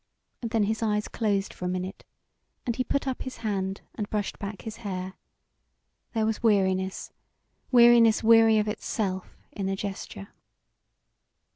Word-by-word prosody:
And 230 - -3
then 225 -2 +2
his 220 +2 -1
eyes 210 -1 0
closed 205 -3 -1
for 180 - -7
a - - 0
minute 185 +1 -4 0.6
and 235 - -1
he 255 - 0
put 275 +2 -1
up 260 - -2
his 260 - -6
hand 195 -2 -2
and 210 -2 -4
brushed 210 -2 -2
back 200 -2 -6
his 220 0 -6
hair; 185 -2 -5 1.0
there 220 -2 +1
was 220 0 -1
weariness, 190 -3 +1 0.6
weariness 235 -3 +6
weary 225 0 +6
of 210 0 +1
itself, 200 -3 -3
in 195 -1 -3
the 195 - 0
gesture. 200 +1 -6
210 Hz, 150 wpm, -27 LUFS, 195-225 Hz, 1.0 s, weariness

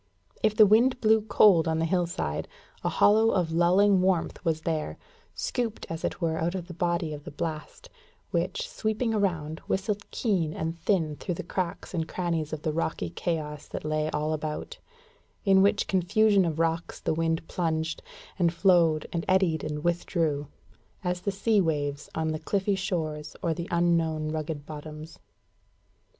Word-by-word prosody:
If 215 -1 +2
the 215 - +8
wind 235 +5 +4
blew 220 -1 +4
cold 200 -5 +5
on 160 0 +1
the 165 - +1
hillside, 165 - -1 0.4
a - - +1
hollow 220 +2 +4
of 180 -6 +1
lulling 185 +4 +4
warmth 185 -3 0
was 160 -2 0
there, 160 -2 -2 0.4
scooped 235 -4 -2
as 165 0 -5
it - - -2
were 160 -2 0
out 170 +3 -1
of 175 -2 -5
the 175 - -8
body 170 -2 -1
of 145 -1 -8
the - - -7
blast, 155 +1 -5 0.4
which, - - -1
sweeping 225 - -1
around, 165 -7 -1
whistled 200 +1 -2
keen 180 -9 0
and 160 +1 -3
thin 165 -5 0
through 180 - -3
the - - -5
cracks 180 +1 -4
and 160 -2 -1
crannies 170 -4 -2
of 155 -1 -5
the 155 - 0
rocky 155 - -2
chaos 150 - -3
that - - -6
lay 155 0 0
all 155 +1 -1
about; 155 0 -4 0.7
in 195 -1 +6
which 205 +1 +3
confusion 195 +2 +3
of 160 -2 -2
rocks 165 +1 -1
the - - -1
wind 165 0 -1
plunged, 160 -2 -1 0.4
and 170 -2 +3
flowed, 170 -3 +3
and 170 -1 -1
eddied, 185 -5 +2
and 150 0 -4
withdrew, 165 -4 0 0.6
as 180 0 -1
the 200 - -1
sea 205 +1 +2
waves 145 -4 -2
on 160 0 0
the 155 0 -2
cliffy 200 +3 0
shores 160 -6 -3
or 165 - +1
the 170 +1 -5
unknown 165 -3 +1
rugged 155 -2 -4
bottoms. 155 +1 -9
170 Hz, 165 wpm, -27 LUFS, 155-190 Hz, 0.7 s, the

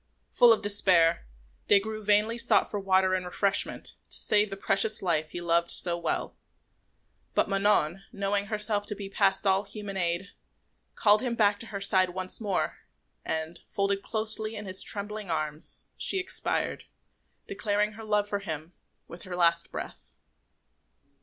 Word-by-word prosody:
Full 240 -1 +6
of 225 - +2
despair, 180 - +5 0.4
Des 200 - +6
Grieux 215 +2 -6
vainly 210 +3 +2
sought 235 - +2
for 205 - -3
water 190 -1 +2
and 185 -1 -1
refreshment, 195 +2 -1 0.2
to - - 0
save 210 0 +3
the 195 - -7
precious 195 +2 +3
life 160 -4 0
he 175 - -6
loved 170 0 +1
so 175 -1 +1
well; 170 -1 -3 1.0
but - - +2
Manon, 195 -3 +1
knowing 200 -2 -2
herself 210 -1 0
to 210 - -4
be 200 -1 -7
past 195 0 +1
all 190 0 +3
human 205 -1 -8
aid, 175 +2 -1 0.6
called 210 0 +4
him 245 -2 -2
back 205 -2 +2
to 230 - -10
her 200 -2 -6
side 190 -2 +3
once 185 +3 0
more, 200 -4 -2 0.5
and, 160 +1 -4
folded 200 0 -1
closely 220 0 -1
in 210 - -7
his 185 0 +1
trembling 210 -1 -1
arms, 155 -1 0
she - - +1
expired, 375 0 -2 0.6
declaring 205 +1 -1
her 220 +1 -11
love 210 -1 0
for 205 -1 -2
him 160 -3 -7 0.3
with 170 - -11
her 185 -3 -7
last 170 -1 +1
breath. - - -9
200 Hz, 160 wpm, -27 LUFS, 180-210 Hz, 1.0 s, Full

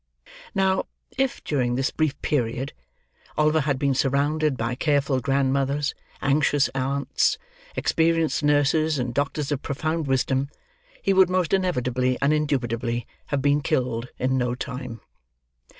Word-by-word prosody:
Now, 190 -1 +2 0.3
if, 270 -1 -1
during 125 -5 0
this 135 +1 0
brief 150 -3 -1
period, 125 -1 -1 0.6
Oliver 155 +1 +3
had 140 -2 0
been 140 0 +1
surrounded 140 +2 +1
by 115 +1 -1
careful 140 0 +1
grandmothers, 140 +2 +1 0.3
anxious 145 0 +3
aunts, 135 +1 0 0.4
experienced 165 -1 +1
nurses, 150 +1 +2
and 125 -2 -2
doctors 145 +2 -1
of 145 -2 -1
profound 155 +2 -2
wisdom, 135 +1 +1 0.5
he 195 - +3
would 190 -1 +5
most 185 -2 0
inevitably 130 -9 +1
and 140 +2 +3
indubitably 120 -5 -1 0.2
have 140 -2 -1
been 145 +1 +3
killed 125 -3 -1
in 130 +1 +1
no 125 -1 0
time. 125 -3 -6
140 Hz, 130 wpm, -24 LUFS, 130-155 Hz, 0.6 s, would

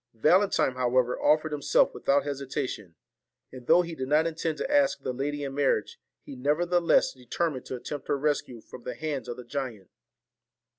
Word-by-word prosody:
Valentine, 155 - +3
however, 125 0 +1
offered 155 +1 +3
himself 145 -2 +2
without 140 0 +1
hesitation; 135 - -4 0.6
and 125 -2 -11
though 180 - +6
he 170 -1 -6
did 130 -4 -4
not 150 +3 +3
intend 160 -1 -2
to 270 - -3
ask 285 -2 +3
the 130 - -2
lady 145 +3 -3
in 135 -1 -4
marriage, 135 -6 0 0.2
he - - -9
nevertheless 170 +6 +2
determined 130 +2 -3
to - - -4
attempt 140 +3 -7
her - - +1
rescue 140 -5 -1
from 120 - -12
the 125 - -6
hands 150 -6 -4
of 120 - -5
the 125 - -9
giant. 120 -7 -5
140 Hz, 175 wpm, -27 LUFS, 125-155 Hz, 0.6 s, though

